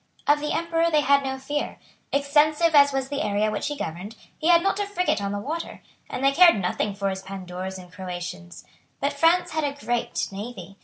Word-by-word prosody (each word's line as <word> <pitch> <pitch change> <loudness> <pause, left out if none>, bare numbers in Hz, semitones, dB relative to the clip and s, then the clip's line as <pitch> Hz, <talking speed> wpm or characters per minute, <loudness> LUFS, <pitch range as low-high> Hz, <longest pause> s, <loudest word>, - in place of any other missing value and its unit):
Of 295 0 +4
the 300 0 -3
Emperor 335 0 +1
they 305 -2 +3
had 280 0 +3
no 265 0 -3
fear. 290 +2 -3 0.3
Extensive 300 +3 +3
as 285 -1 +7
was 270 -1 -2
the 285 - -2
area 210 +1 0
which 210 - -2
he 295 - -4
governed, 180 +5 -6 0.2
he 315 - -1
had 340 -1 +6
not 390 +1 +1
a 410 - -1
frigate 360 - 0
on 200 0 -2
the 205 - -2
water; 310 +11 -5 0.3
and 255 - -4
they 275 - +5
cared 340 - +6
nothing 195 +2 -1
for 200 -1 -1
his 190 0 -5
Pandours 190 -1 -6
and 180 -1 -13
Croatians. 175 - -7 0.3
But 280 +1 0
France 340 +4 +3
had 315 0 -1
a 280 -1 -1
great 240 -3 -1
navy. 195 -2 -8
275 Hz, 210 wpm, -25 LUFS, 195-310 Hz, 0.3 s, as